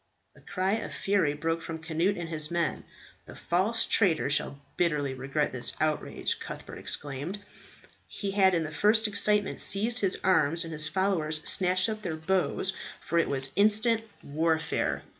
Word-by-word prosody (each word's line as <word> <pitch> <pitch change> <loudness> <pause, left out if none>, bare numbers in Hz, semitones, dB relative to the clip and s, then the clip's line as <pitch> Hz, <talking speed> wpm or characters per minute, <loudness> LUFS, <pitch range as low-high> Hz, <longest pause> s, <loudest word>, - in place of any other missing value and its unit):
A - - -19
cry 185 +1 -2
of - - -6
fury 195 -7 +1
broke 165 +2 -2
from 165 0 -6
Cnut 165 +5 0
and 170 - -5
his 155 -2 -2
men. 170 -2 -2 0.4
"The - - -11
false 195 +7 +1
traitor 165 -9 +2
shall 140 -1 0 0.2
bitterly 150 -6 0
regret 135 +3 -2
this 125 -1 +1
outrage," 155 -1 -1
Cuthbert - - -8
exclaimed. 145 +7 -4 0.7
He 200 -1 -4
had 190 -2 +4
in 165 - 0
the 155 - -6
first 215 +7 +3
excitement 210 0 +1
seized 225 +5 +3
his 195 -4 +2
arms, 170 -3 +3
and 165 -1 -7
his 155 0 +1
followers 160 -5 0
snatched 185 0 +3
up 215 -1 -4
their 170 -6 -4
bows, 190 +3 0
as - - -11 0.3
if - - -21
for 170 - +1 0.4
instant 215 +2 +3 0.2
warfare. 160 +2 -1
170 Hz, 160 wpm, -28 LUFS, 155-200 Hz, 0.7 s, had